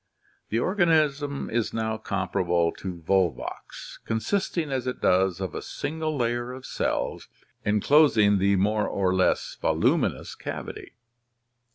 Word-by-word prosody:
The 110 - 0
organism 150 - +1
is 115 -1 -1
now 110 -1 -1
comparable 90 -5 0
to 90 -3 -7
Volvox, 95 -2 -2
consisting 155 - -1
as 130 -1 -2
it 125 - -3
does 95 0 +2
of 95 -4 -4
a - - -4
single 155 0 -3
layer 120 0 -1
of 130 0 -9
cells - - -2 0.4
enclosing 105 -2 +4
the 100 +1 +3
more 105 +2 +1
or 95 -2 0
less 95 0 +1
voluminous - - +1
cavity. - - -7
110 Hz, 125 wpm, -26 LUFS, 95-140 Hz, 0.4 s, enclosing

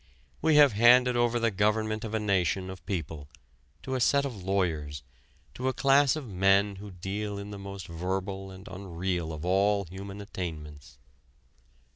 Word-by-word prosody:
We 160 -1 +3
have 145 -2 +7
handed 125 +3 +6
over 120 0 +2
the 115 -1 +1
government 110 +2 0
of 110 -1 -4
a - - +1
nation 95 -2 0
of 95 -2 -11
people 80 -7 -4 0.5
to 130 - -4
a 130 - 0
set 140 +4 +3
of 135 -4 -4
lawyers, 80 -8 -1 0.5
to 130 - -3
a 130 - +1
class 140 +1 +4
of 150 -5 -6
men 100 +1 +2
who 105 +1 -9
deal 100 +3 -4
in 100 +1 -7
the 100 - -7
most 100 -2 -7
verbal 95 +3 -4
and 95 +1 -12
unreal 90 -3 -3
of 80 +1 -6
all 100 +2 +2
human 95 +3 -8
attainments. 80 -7 -7
100 Hz, 165 wpm, -28 LUFS, 90-110 Hz, 0.5 s, have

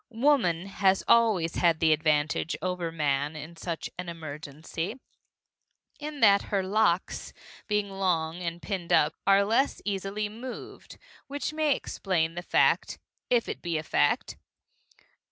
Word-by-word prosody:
Woman 230 - +2
has 195 -1 +2
always 210 -8 +3
had 170 -2 +3
the 160 -1 +5
advantage 155 +1 +1
over 180 -2 -2
man 145 -1 0
in 155 +3 -8
such 165 0 -4
emergency, 165 - -6 1.0
in 295 -1 -6
that 200 -2 +6
her 195 -2 +1
locks, 190 -2 0 0.3
being 210 -1 0
long 180 -4 -1
and 170 0 -4
pinned 185 -5 -4
up, 150 - +4
are 200 0 +5
less 235 +7 +1
easily 200 +1 -2
moved 235 +4 -9 0.3
which 285 +1 -3
may 305 -3 +2
explain 165 -4 -1
the 175 - -5
fact - - +2 0.3
(if 240 -2 +2
it - - -5
be 170 -2 -1
a 155 - -3
fact!) - - +1
180 Hz, 135 wpm, -28 LUFS, 165-210 Hz, 1.0 s, that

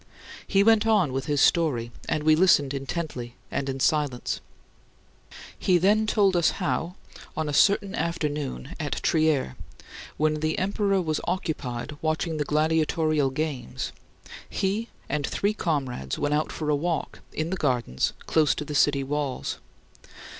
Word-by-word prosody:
He 195 0 +4
went 225 0 +4
on 200 -11 +3
with 135 0 -2
his 145 -2 +1
story, 130 -9 +2 0.2
and 150 - 0
we 155 0 +5
listened 155 -5 +4
intently 135 -3 -4 0.2
and 140 -1 -2
in 135 0 -3
silence. 145 -3 0 1.2
He 180 - +3
then 210 +5 +3
told 200 -3 +3
us 170 -2 +3
how, 180 -1 -1 0.4
on 155 -1 -1
a 145 - -2
certain 200 +4 +3
afternoon, 150 -3 -3
at 150 -2 -2
Trier, 155 - +2 0.6
when 155 0 +1
the 155 +1 -1
emperor 195 0 +1
was 155 -2 -1
occupied 150 -6 -3
watching 160 +1 -1
the 150 - -1
gladiatorial 155 -1 +2
games, 135 - -3 0.6
he 205 +4 -1 0.2
and 145 -2 -1
three 205 +1 0
comrades 135 - -2
went 145 0 0
out 150 +1 0
for 150 -1 -2
a - - +3
walk 165 +3 -2
in 160 +2 -3
the - - 0
gardens 125 - 0
close 155 -4 +3
to 150 - -4
the 150 - -5
city 140 -1 +3
walls. 140 -1 -3
155 Hz, 145 wpm, -26 LUFS, 140-175 Hz, 1.2 s, we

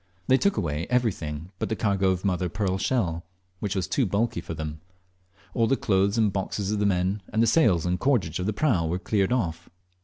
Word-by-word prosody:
They 130 - +5
took 200 - +1
away 80 -2 -2
everything 90 -10 -1
but - - -2
the 110 - 0
cargo 100 -3 +1
of 95 +1 -1
mother 90 -2 +1
of 85 - -10
pearl 95 -3 -1
shell, 90 -8 0 0.4
which 100 -1 -2
was 95 - -1
too 130 -6 +1
bulky 100 -1 0
for 85 - -6
them. 75 -1 -6 0.7
All 115 -1 +2
the 135 - +2
clothes 100 +1 +1
and 105 -3 +2
boxes 100 +1 -2
of 105 - 0
the 105 - +2
men, 95 +2 0
and 110 +1 +2
the - - +4
sails 110 - +3
and 90 +1 0
cordage 105 - +1
of 90 - -2
the - - +2
prau, 105 - +1
were 85 +3 -1
cleared 95 +2 0
off. 90 -8 -1
95 Hz, 220 wpm, -26 LUFS, 90-110 Hz, 0.7 s, They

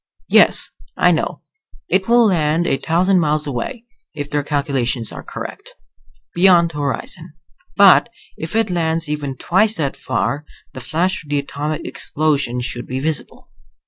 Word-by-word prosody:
Yes, - - +4 0.3
I - - +5
know, - - -1 0.5
it 190 0 +1
will 240 0 +6
land 165 -4 +2
a 135 - +1
thousand 180 +5 +2
miles 150 -2 +1
away, 140 - -4 0.3
if 145 0 -5
their 145 - +1
calculations 135 -5 -1
are - - -8
correct. - - -8 0.6
Beyond 175 -2 +5
the 150 - -7
horizon. 140 -1 -4 0.4
But - - +7 0.3
if 160 +5 -6
it 225 -3 +1
lands 165 -2 0
even 145 -3 -4
twice 210 - +2
that 140 -4 -1
far 145 +2 -2 0.3
the - - -8
flash 180 +3 -1
of 150 - -17
the 145 - +1
atomic 145 +2 -3
explosion 140 -5 -1
should 120 0 -5
be 130 +1 -3
visible. 155 +2 -4
155 Hz, 150 wpm, -19 LUFS, 140-175 Hz, 0.6 s, But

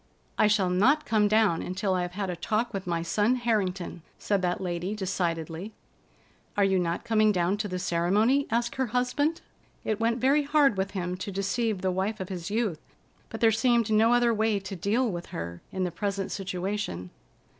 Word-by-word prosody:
"I 215 - +4
shall 200 -4 +2
not 260 +12 +3
come 215 -2 +3
down 210 -5 +3
until 185 +2 -1
I 185 - +1
have 175 0 -4
had 195 -1 -2
a - - -4
talk 220 +7 -1
with 195 -2 -4
my 170 -1 -1
son 210 +8 +2
Harrington," 195 -8 -1 0.2
said 200 -2 0
that 180 -1 0
lady 180 +2 -3
decidedly. 175 -1 -3 0.8
"Are 200 - +4
you 190 -1 +3
not 170 -1 -1
coming 215 -2 +3
down 180 0 +1
to 210 0 -2
the 185 -2 -3
ceremony?" 195 +10 +2
asked 235 +2 -1
her 260 -1 +1
husband. 250 +7 0 0.4
It 215 -1 -1
went 230 +1 +1
very 275 +4 +4
hard 290 -4 +3
with 190 0 -1
him 180 0 -2
to 200 +2 -5
deceive 195 +2 -1
the 185 - +1
wife 195 +4 -2
of 190 - -5
his 175 -3 -5
youth, 210 -7 -1 0.5
but 225 - -7
there 225 -1 +6
seemed 235 0 +2
no 220 +2 +4
other 240 -1 +4
way 220 -1 +1
to 195 0 -6
deal 215 +8 +1
with 175 -5 -4
her 85 +1 -6
in 185 - -2
the 180 - -1
present 195 +2 -3
situation. 185 - -3
200 Hz, 195 wpm, -27 LUFS, 180-225 Hz, 0.8 s, there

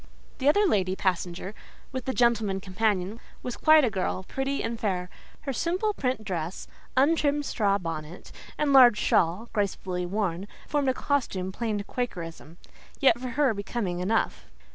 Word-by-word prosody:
The 275 +1 +4
other 410 +7 +4
lady 190 - +1
passenger, 185 0 -2 0.4
with 260 -2 -4
the 260 - -1
gentleman 225 -5 +2
companion, 195 +1 -1 0.2
was 250 - -4
quite 310 -1 +6
a 235 - 0
girl, 190 -1 -2
pretty 270 +7 -2
and 230 0 -3
fair: 180 -4 -2 0.3
her 275 - -3
simple 370 - 0
print 255 - -2
dress, 175 -3 -4 0.3
untrimmed 290 0 +3
straw 200 -6 +1
bonnet 165 -2 -6 0.3
and 295 -2 +1
large 245 -5 +8
shawl, 180 +7 +1
gracefully 185 -3 -2
worn, 195 -1 -2 0.2
formed 285 -3 +1
a 260 - +1
costume 200 -11 -1
plain 220 +1 -2
to 200 - -3
quakerism: 170 -9 -5 0.4
yet, 250 -5 +4
for 255 - -4
her, 260 0 +2
becoming 200 -3 -3
enough. 210 +5 0
215 Hz, 155 wpm, -27 LUFS, 185-260 Hz, 0.4 s, large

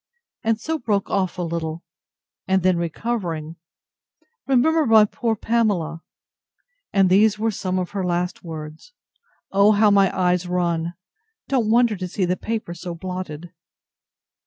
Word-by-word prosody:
—and 225 -1 +1
so 320 +5 -3
broke 205 -4 -1
off 190 -2 0
a 180 - -2
little; 165 0 -4 0.6
and 190 -1 +2
then 185 -1 +4
recovering—Remember 225 - -3
my 220 -2 +7
poor 225 +2 -2
Pamela—And 205 - -2
these 205 +3 +4
were 225 +1 0
some 185 -2 -2
of 180 -1 -2
her 195 -2 -2
last 180 0 -2
words! 155 - -9 0.6
O 200 +2 +5
how 210 0 +4
my 195 -1 +5
eyes 180 0 +1
run—Don't 180 - -3
wonder 235 -1 +4
to 185 0 -4
see 185 +1 -1
the 180 +1 0
paper 220 -4 -4
so 175 0 -7
blotted. 175 -2 -6
190 Hz, 130 wpm, -22 LUFS, 175-225 Hz, 0.6 s, my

